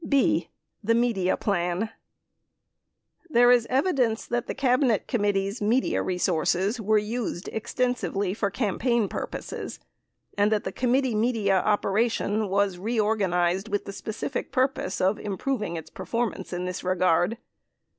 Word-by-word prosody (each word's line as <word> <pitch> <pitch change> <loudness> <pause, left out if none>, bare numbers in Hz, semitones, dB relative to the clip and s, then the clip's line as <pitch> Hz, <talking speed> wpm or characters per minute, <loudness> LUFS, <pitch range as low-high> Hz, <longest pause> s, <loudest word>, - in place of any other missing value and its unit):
19 - - -7
b. 280 -2 +2 0.3
The 230 +3 +3
Media 230 -6 +1
Plan 185 +2 -1 1.4
There 245 -3 +6
is 240 -2 +4
evidence 260 -5 +1
that 240 0 -2
the - - -4
Cabinet 255 -4 +2
Committee's 205 -2 0
media 230 +5 +2
resources 185 +4 0
were 215 +1 +3
used 210 -3 -3
extensively 220 -4 -1
for 205 -1 -1
campaign 230 +1 0
purposes - - -6 0.6
and 205 +1 +2
that 215 -1 +1
the - - -3
committee 255 0 +1
media 215 -3 +2
operation 210 +1 +1
was 195 -2 +1
reorganized 195 -4 +1
with 205 -1 -1
the 200 - -6
specific 215 +2 -4
purpose 255 -6 0
of 190 +3 +2
improv 215 +5 -2
ing 170 -5 -3
its 160 -1 -7
performance 230 -2 -3
in 180 0 -3
this 180 0 -4
regard. 180 +3 +2
210 Hz, 135 wpm, -26 LUFS, 195-240 Hz, 1.4 s, There